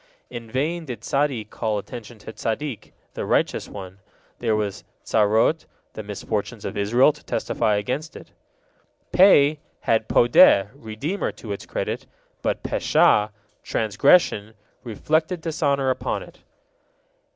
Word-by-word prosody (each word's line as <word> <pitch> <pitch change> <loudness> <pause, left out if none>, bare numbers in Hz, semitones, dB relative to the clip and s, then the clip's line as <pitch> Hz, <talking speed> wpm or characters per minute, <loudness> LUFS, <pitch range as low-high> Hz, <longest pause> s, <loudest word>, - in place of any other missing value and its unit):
In 120 -2 -8
vain 160 +7 -2
did 120 -6 -7
Zadde 135 -6 0
call 110 -2 -2
attention 115 +3 -8
to 110 +1 -10
Zaddik, 120 +3 -4 0.2
the - - -4
Righteous - - 0
One; 95 -1 -9 0.4
there 110 - +1
was 105 -3 -3 0.2
Zarot, 110 +9 +2 0.3
the - - -6
misfortunes 105 +2 -4
of - - -4
Israel, 120 +8 +3
to 150 - -18
testify 105 - 0
against 130 +10 -3
it. - - -12 0.8
Pe 155 -6 +5 0.2
had 110 -1 +1
Podeh, 105 -4 +6
redeemer, 140 - -4
to 110 - -9
its 100 - -6
credit, - - -4 0.3
but - - -2
Pesha: 105 0 +3 0.3
transgression, 110 - +2 0.3
reflected 155 - -1
dishonor 140 -5 0
upon - - -3
it. - - -16
115 Hz, 125 wpm, -23 LUFS, 105-145 Hz, 0.8 s, Podeh